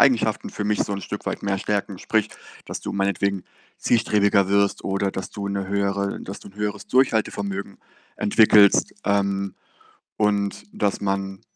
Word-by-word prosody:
Eigenschaften 120 -5 +3
für 105 - -4
mich 105 0 +1
so 100 - -4
'n 100 - -5
Stück - - -6
weit - - -3
mehr 100 -1 0
stärken. 100 -2 -2
Sprich, 110 -1 0 0.4
dass - - -5
du - - -5
meinetwegen 100 -1 0 0.3
zielstrebiger 100 -4 +3
wirst 100 0 +2
oder 95 0 0
dass 95 - -5
du 100 -1 -5
'ne 100 -1 -3
höhere 100 0 -1
dass 95 - -7
du - - -12
'n 95 - -17
höheres 105 0 -3
Durchhaltevermögen 100 -6 0 0.4
entwickelst, 105 -1 +5
ähm, 100 -1 0 0.6
und 100 -1 0
dass 100 -1 -1
man 95 -1 -2
100 Hz, 155 wpm, -23 LUFS, 100-105 Hz, 0.6 s, entwickelst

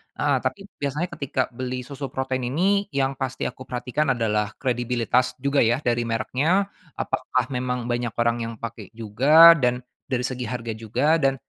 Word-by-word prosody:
heeh. - - +1
Tapi - - -3 0.2
biasanya 145 +5 -2
ketika 135 -2 -1
beli 125 +1 -4
susu 140 +1 -6
protein 130 -2 -2
ini 195 +9 +1
yang 135 0 +2
pasti 130 -1 -3
aku 130 - -5
perhatikan 130 +3 -1
adalah 105 -3 -1
kredibilitas 125 0 0
juga 140 +2 0
ya, 120 +5 +2
dari 120 -1 0
mereknya. 145 - 0 0.2
Apakah 130 -1 -1
memang 125 -1 -2
banyak 120 -1 -2
orang 120 0 +1
yang 115 0 -4
pakai 115 -2 -7
juga 135 +10 +7
dan 125 0 0 0.2
dari 125 -1 -1
segi 125 -1 -3
harga 120 -2 -4
juga 125 +9 +1
dan 135 -2 +2
125 Hz, 160 wpm, -24 LUFS, 120-140 Hz, 0.2 s, juga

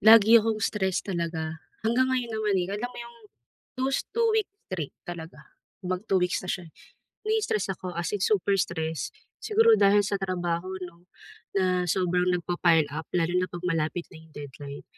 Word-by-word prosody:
lagi 220 +1 +8
akong 220 0 0
stress 190 -3 0
talaga. 165 -3 -3 0.2
Hanggang 245 +3 +3
ngayon 250 -3 -1
naman, 215 -2 0
eh, 180 -1 +1
alam 210 +4 -2
mo 245 - -14
'yong 235 0 -12 0.6
those 265 +1 0
2 465 +1 +2
weeks 435 -3 0 0.2
straight 165 -7 -4
talaga, 170 -1 -8 0.4
mag 180 0 -1
2 195 - +3
weeks 180 0 +1
na - - -7
siya, 180 -1 -2
eh, - - -47 0.5
na-i-stress 425 - 0
ako, 185 0 -7
as 170 0 -1
in 205 - -1
super 200 -2 +2
stress. 160 -2 -2 0.3
Siguro 450 +1 +4
dahil 205 +1 +5
sa 200 +1 0
trabaho 175 -2 -2 0.2
'no? 175 0 -13 0.5
Na 185 -1 +2
sobrang 180 0 +1
nagpapa-pile 175 -3 +2
up, 160 0 -5
lalo 170 0 +1
na 180 - +1
'pag 175 0 -8
malapit 165 0 0
na 165 - -11
'yong 160 -1 -19
deadline. 145 0 -8
180 Hz, 175 wpm, -27 LUFS, 170-215 Hz, 0.6 s, lagi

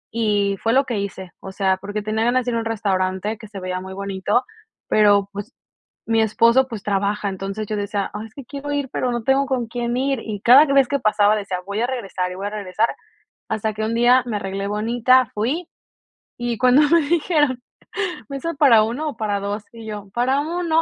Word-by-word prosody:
y 205 -3 +1
fue 225 +1 +2
lo 270 +1 +4
que 235 -5 -2
hice. 190 -2 -6
O 190 - -8
sea, 190 -1 +1
porque 205 +2 -5
tenía 215 +1 -1
ganas 250 +1 +2
de 245 - -1
ir - - -1
a - - +1
un 225 - -4
restaurante 200 -1 -1
que 220 - -10
se 200 -2 -8
veía 185 0 -3
muy 190 0 -8
bonito, 200 +4 -1 0.5
pero, 205 -2 +4
pues, 205 +6 -7 0.5
mi 225 0 +2
esposo, 235 +4 +4
pues, 225 -5 -7
trabaja. 205 +1 0
Entonces, 195 +2 -4
yo 215 - -2
decía: 200 -1 -2
"Ah, 210 +1 -5
es 220 - -15
que 275 - -9
quiero 285 +3 -6
ir, 285 -2 -2
pero 250 - -1
no 240 -2 -3
tengo 270 +2 +3
con 250 -3 -1
quién 240 +1 -3
ir", 270 -1 0
y 210 -2 -5
cada 260 +7 +8
vez 275 -3 +4
que 280 0 -1
pasaba 210 0 +3
decía: 195 -3 -3
"Voy 200 +2 -3
a 240 - +1
regresar 195 -8 -3
y 180 - -6
voy 200 +2 -4
a - - -5
regresar", 210 +1 -1 0.6
hasta 220 0 -1
que 215 0 -3
un 225 - -1
día 245 +2 +5
me 220 -3 -2
arreglé 195 0 -4
bonita, 235 +4 +3
fui, 270 +12 -2 0.7
y 240 -1 -2
cuando 255 +5 +5
me 335 0 +5
dijeron: 295 -4 +1 0.7
"¿Mesa 280 +4 -4
para 270 -7 +6
uno 260 +8 -2
o 250 - -9
para 210 -2 -1
dos?" 200 +1 -4
Y 225 -1 -10
yo: 205 -2 -7
"Para 255 +3 +1
1". 330 +1 0
220 Hz, 215 wpm, -21 LUFS, 200-255 Hz, 0.7 s, cada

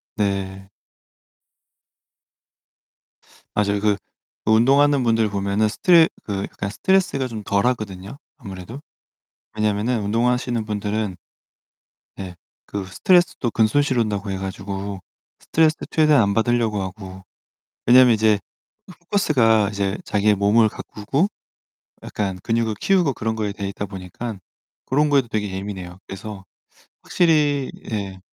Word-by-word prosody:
네. 95 -1 -2 2.9
맞아요. 100 -1 +1
그 105 -1 +2 0.5
운동하는 135 +5 +4
분들 115 -2 +2
보면은 100 +2 0
스트 170 - +5 0.2
그 100 -2 -3
약간 100 - -5
스트레스가 160 - +1
좀 110 -4 -7
덜하거든요, 100 0 -1 0.2
아무래도. 95 +8 -9 0.7
왜냐하면은 110 +2 0
운동하시는 120 +1 0
분들은 105 -2 -2 1.0
네. 95 -2 -7 0.3
그 100 -2 -4
스트레스도 175 - +2
근손실 125 +4 +2
온다고 105 -2 -1
해 95 - -2
가지고 95 0 -5 0.4
스트레스 160 0 +2
최대한 155 -5 +4
안 100 -1 +1
받으려고 115 -3 +1
하고 95 0 -8 0.6
왜냐면 125 0 +7
이제 110 -1 +3 0.5
포커스가 135 - +2
이제 100 0 -1
자기의 105 0 +2
몸을 105 +3 +4
가꾸고 110 - -2 0.8
약간 95 -3 -3
근육을 115 -1 0
키우고 180 -8 +2
그런 110 0 -2
거에 105 -2 -2
되있다 100 0 -5
보니깐 95 +3 -7 0.5
고런 150 +3 +2
거에도 135 -4 +3
되게 105 -3 -2
예민해요. 95 -2 -6
그래서 100 0 -8 0.6
확실히 150 -5 +2 0.2
예. 100 -3 -4
110 Hz, 280 characters per minute, -22 LUFS, 100-125 Hz, 2.9 s, 왜냐면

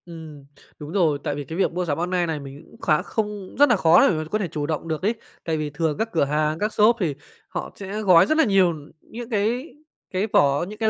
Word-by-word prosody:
Ừm, 160 -4 -11 0.3
đúng 150 +1 -8
rồi. 165 -7 +1
Tại 145 - -2
vì 145 - -5
cái 160 +4 -7
việc 195 - +1
mua 180 +1 -2
sắm 145 -4 -1
online 175 +1 0
này, 160 -2 -2
mình 140 +1 -10
cũng - - -18
khá 155 -2 +2
không, 210 -3 -4
rất 290 -1 +6
nà 240 - +5
khó 170 -2 +5
để - - +1
mà 155 - -2
có 215 - 0
thể 195 - -1
chủ 150 -2 -4
động 155 +1 -3
được 160 -2 -3
ấy. 215 +5 0 0.3
Tại 160 -1 -1
vì 155 -1 -3
thường 150 +1 -2
các 225 +1 -1
cửa 165 - +2
hàng, 150 +2 0
các 210 +1 -1
shop 215 +3 +4
thì 160 -8 -1 0.3
họ 175 - -5
sẽ 200 +2 -5
gói 180 -5 +6
rất 310 - +1
là 320 - +5
nhiều 195 - +3 0.3
những 235 +1 -9
cái 235 +6 -1 0.4
cái 190 +3 -1
vỏ, 145 +3 +3
những 210 +2 -10
cái 220 -1 +2
175 Hz, 260 wpm, -23 LUFS, 155-210 Hz, 0.4 s, rất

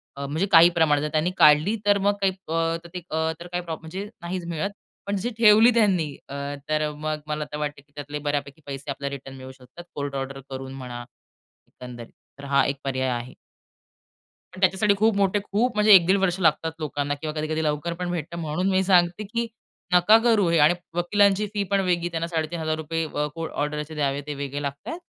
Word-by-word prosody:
अ, 140 0 -5
म्हणजे 155 +7 -1
काही 170 0 +8
प्रमाणात. 150 -3 +3
जर 150 - -2
त्यांनी 160 +3 +1
काढली 150 +8 +5
तर 205 0 +4
मग 205 - +4
काही 195 - +3 0.2
अ, 160 - -4
अ, 165 0 -2
तर 175 - -9
काही 180 0 -3
प्रॉब्लेम 160 -2 -5
म्हणजे 190 +6 -6
नाहीच 175 0 -4
मिळत. 170 +3 -2 0.4
पण 200 - -1
जशी 200 +5 -2
ठेवली 225 +1 +7
त्यांनी 195 -8 +3 0.2
अ, - - -7 0.4
तर 155 0 +1
मग 155 +1 -3
मला 150 0 -2
आता 150 0 -7
वाटतं, 150 -1 -4
की 145 +1 -34
त्यातले 145 0 -6
बऱ्यापैकी 145 +1 -3
पैसे 140 0 -6
आपल्याला 140 0 -4
रिटर्न 135 0 -10
मिळू 130 0 -9
शकतात. 130 +6 -14
कोर्ट 140 -1 -4
ऑर्डर 135 0 -4
करून 135 0 -6
म्हणा. 125 -2 -7 0.6
एकंदरीत. 120 -2 -11 0.3
तर 140 - -9
हा 140 - +5
एक 140 0 -1
पर्याय 130 -1 -1
आहे. 120 +1 -4 1.2
पण 185 - -10
त्याच्यासाठी 190 +3 +3
खूप 220 +1 +3
मोठे 200 +1 +2
खूप 225 +4 0
म्हणजे 210 0 +6
1-1.5 190 +1 +6
वर्ष 190 -1 0
लागतात 160 -1 +2
लोकांना 145 -1 -2
किंवा 155 -1 -3
कधी-कधी 155 +1 -1
लवकर 150 +3 -1
पण 175 +1 -4
भेटतं 170 0 -4
म्हणून 165 +4 -1
मी 190 0 +2
सांगते, 180 +1 +3
की 230 +3 -3 0.5
नका 180 +5 +7
करू 220 -6 +3
हे. 170 - +3
आणि 150 +4 +6 0.2
वकिलांची 200 +3 +3
फी 205 -1 0
पण 200 - +3
वेगळी. 175 -2 0
त्यांना 165 0 -2
₹3,500 160 -1 -2
अ, 150 -1 -2
कोर्ट 165 -1 -5
ऑर्डरचे 150 +1 -3
द्यावे 140 -1 -1
ते 150 - -3
वेगळे 140 +1 -4
लागतात. 140 - -5
160 Hz, 195 wpm, -24 LUFS, 145-185 Hz, 1.2 s, काही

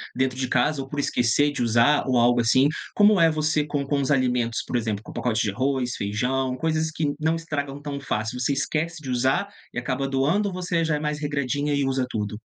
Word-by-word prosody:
dentro 130 0 0
de 130 - -1
casa 150 +2 +1
ou 135 - -7
por 145 +1 -5
esquecer 140 +2 +2
de 145 - -4
usar 120 +5 +3
ou 130 -1 +2
algo 120 0 +4
assim. 125 +4 +4 0.3
Como 205 -1 +5
é 165 -1 +6
você 155 -1 +1
com 145 -1 -2
com 140 +1 0
os 135 - -2
alimentos? 125 -4 +1
Por - - -4
exemplo, 110 -3 -2
com - - -10
o - - -12
pacote 115 -2 0
de 105 - 0
arroz, 130 +2 -1
feijão, 125 +6 -1
coisas 160 +3 0
que 150 -2 -1
não 160 +1 +1
estragam 145 -4 -4
tão 145 -1 -5
fácil, 120 -2 -3
você 130 +3 +1
esquece 155 +4 -2
de 135 - -6
usar, 130 +10 +1 0.2
e - - -8
acaba 130 +2 -2
doando, 140 +10 +1
ou - - -7
você 175 -2 -1
já 160 -2 +1
é - - -2
mais 150 0 -2
regradinha 145 0 -1
e 140 - +1
usa 135 -1 0
tudo? 105 -1 -4
135 Hz, 230 wpm, -24 LUFS, 125-150 Hz, 0.3 s, é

